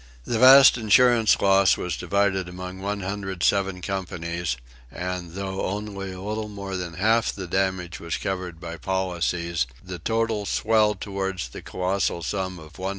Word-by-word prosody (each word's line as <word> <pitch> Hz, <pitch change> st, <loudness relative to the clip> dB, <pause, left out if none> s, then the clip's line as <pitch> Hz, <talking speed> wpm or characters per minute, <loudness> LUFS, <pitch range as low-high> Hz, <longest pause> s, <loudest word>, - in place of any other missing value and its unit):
The 115 Hz, -, -1 dB
vast 130 Hz, 0 st, +9 dB
insurance 115 Hz, 0 st, +5 dB
loss 95 Hz, -1 st, +4 dB
was 90 Hz, -3 st, -3 dB
divided 95 Hz, +1 st, 0 dB
among 90 Hz, +1 st, -7 dB
107 95 Hz, -1 st, -1 dB
companies, 85 Hz, -6 st, -3 dB, 0.3 s
and, 90 Hz, +2 st, -5 dB
though 95 Hz, 0 st, -3 dB
only 100 Hz, -1 st, -4 dB
a 95 Hz, -, -8 dB
little 105 Hz, +2 st, -4 dB
more 100 Hz, -2 st, -6 dB
than 90 Hz, -2 st, -5 dB
half 110 Hz, +5 st, +2 dB
the 95 Hz, -, -7 dB
damage 90 Hz, -1 st, -1 dB
was 85 Hz, -1 st, -3 dB
covered 90 Hz, -3 st, -4 dB
by 85 Hz, -1 st, -7 dB
policies, 85 Hz, -4 st, -1 dB, 0.2 s
the 90 Hz, -2 st, -7 dB
total 110 Hz, +1 st, -1 dB
swelled 105 Hz, -3 st, +2 dB
toward 95 Hz, -2 st, -3 dB, 0.2 s
the -, -, -7 dB
colossal 90 Hz, -2 st, -1 dB
sum 95 Hz, -1 st, -3 dB
of 80 Hz, -1 st, -13 dB
$150,000,000. 95 Hz, 0 st, -4 dB
95 Hz, 150 wpm, -24 LUFS, 90-100 Hz, 0.3 s, vast